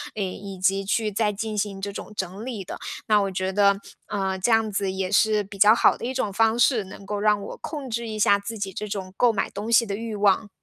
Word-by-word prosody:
嗯， 210 Hz, -, -1 dB
以 195 Hz, +1 st, -6 dB
及 195 Hz, +1 st, +1 dB
去 215 Hz, +2 st, 0 dB
再 210 Hz, +1 st, +1 dB
进 215 Hz, +1 st, -4 dB
行 200 Hz, -1 st, -2 dB
这 200 Hz, +1 st, -3 dB
种 -, -, -8 dB
整 190 Hz, +1 st, -4 dB
理 230 Hz, -6 st, -5 dB
的， -, -, -8 dB, 0.3 s
那 210 Hz, -2 st, +5 dB
我 200 Hz, -1 st, 0 dB
觉 185 Hz, 0 st, -2 dB
得， 200 Hz, 0 st, +4 dB, 0.3 s
呃， 190 Hz, -2 st, -2 dB
这 210 Hz, +6 st, +1 dB
样 225 Hz, -1 st, +3 dB
子 195 Hz, -1 st, -1 dB
也 190 Hz, 0 st, -3 dB
是 215 Hz, 0 st, +3 dB
比 200 Hz, +1 st, -11 dB
较 210 Hz, +3 st, +7 dB
好 -, -, +4 dB
的 -, -, -7 dB
一 250 Hz, -, -2 dB
种 215 Hz, -6 st, -2 dB
方 225 Hz, +2 st, +3 dB
式， 240 Hz, -2 st, +3 dB
能 195 Hz, +1 st, -11 dB
够 205 Hz, +1 st, -3 dB
让 210 Hz, 0 st, +3 dB
我 200 Hz, -, -7 dB
控 290 Hz, -4 st, -6 dB
制 235 Hz, -1 st, -3 dB
一 215 Hz, -1 st, -5 dB
下 205 Hz, -1 st, +4 dB
自 220 Hz, +3 st, -6 dB
己 195 Hz, -2 st, -4 dB
这 210 Hz, -, -5 dB
种 195 Hz, -3 st, -5 dB
购 245 Hz, +2 st, +4 dB
买 215 Hz, -, -1 dB
东 210 Hz, +3 st, -5 dB
西 230 Hz, 0 st, +5 dB
的 200 Hz, -2 st, -3 dB
欲 225 Hz, 0 st, -5 dB
望。 205 Hz, +1 st, +2 dB
205 Hz, 275 characters per minute, -24 LUFS, 195-220 Hz, 0.3 s, 较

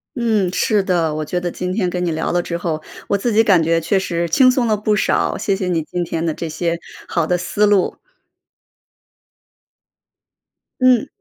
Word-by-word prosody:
嗯， 220 Hz, -6 st, +1 dB
是 205 Hz, -1 st, +2 dB
的， 170 Hz, -4 st, 0 dB
我 155 Hz, 0 st, -3 dB
觉 180 Hz, +4 st, -2 dB
得 175 Hz, -, -2 dB
今 180 Hz, +1 st, -4 dB
天 185 Hz, -4 st, 0 dB
跟 180 Hz, 0 st, -3 dB
你 170 Hz, -, 0 dB
聊 160 Hz, 0 st, -2 dB
了 175 Hz, -, +1 dB
之 170 Hz, -1 st, -3 dB
后， 165 Hz, -2 st, -2 dB, 0.3 s
我 200 Hz, -, +1 dB
自 230 Hz, +2 st, -1 dB
己 225 Hz, +1 st, +5 dB
感 190 Hz, -6 st, +4 dB
觉 165 Hz, +1 st, +1 dB
确 195 Hz, +4 st, +1 dB
实 170 Hz, -3 st, -1 dB
轻 260 Hz, -2 st, +5 dB
松 250 Hz, -2 st, 0 dB
了 215 Hz, -, +2 dB
不 210 Hz, 0 st, +1 dB
少， -, -, +1 dB
谢 195 Hz, -, 0 dB
谢 190 Hz, -2 st, -3 dB
你 170 Hz, -3 st, 0 dB
今 175 Hz, +3 st, -3 dB
天 165 Hz, -1 st, -3 dB
的 165 Hz, -, 0 dB
这 165 Hz, -, -4 dB
些 170 Hz, +2 st, -2 dB, 0.3 s
好 170 Hz, -2 st, 0 dB
的 180 Hz, +2 st, +1 dB
思 180 Hz, +4 st, 0 dB
路。 205 Hz, -3 st, +2 dB, 2.8 s
嗯。 255 Hz, -3 st, +4 dB
180 Hz, 210 characters per minute, -19 LUFS, 170-210 Hz, 2.8 s, 己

